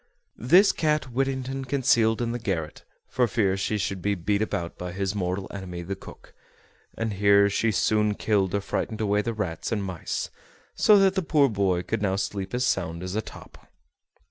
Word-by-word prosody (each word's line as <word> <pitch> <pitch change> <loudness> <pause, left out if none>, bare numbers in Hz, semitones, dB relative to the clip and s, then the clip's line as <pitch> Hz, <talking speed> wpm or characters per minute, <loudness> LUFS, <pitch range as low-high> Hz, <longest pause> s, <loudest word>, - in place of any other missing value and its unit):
This 180 - +6
cat 150 -5 0
Whittington 135 +1 -2
concealed 120 -4 +2
in 115 - -1
the 120 - -3
garret, 90 -9 -3 0.2
for 125 -1 +1
fear 100 -3 +1
she 100 +2 -1
should 95 -1 -3
be 100 +2 0
beat 100 +3 -1
about 100 -5 -2
by 90 0 -6
his 95 +1 -2
mortal 95 -1 -2
enemy 90 -3 -6
the 95 +3 -4
cook, - - -14 0.6
and 115 -2 -2
here 100 0 +4
she 115 +3 +1
soon 105 +1 +1
killed 100 -3 +1
or 100 - 0
frightened 110 +2 -3
away 105 -1 +1
the 115 +1 -3
rats 90 -6 -3
and 105 -3 -1
mice, 95 -3 -4 0.4
so 210 - +5
that 195 -1 +4
the 190 - 0
poor 150 -4 +3
boy 95 -4 0
could 115 +2 -3
now 95 -2 +1
sleep 100 +1 -3
as 125 +1 +1
sound 85 -6 -1
as 90 0 -4
a 110 - 0
top. - - -13
105 Hz, 190 wpm, -26 LUFS, 95-120 Hz, 0.6 s, This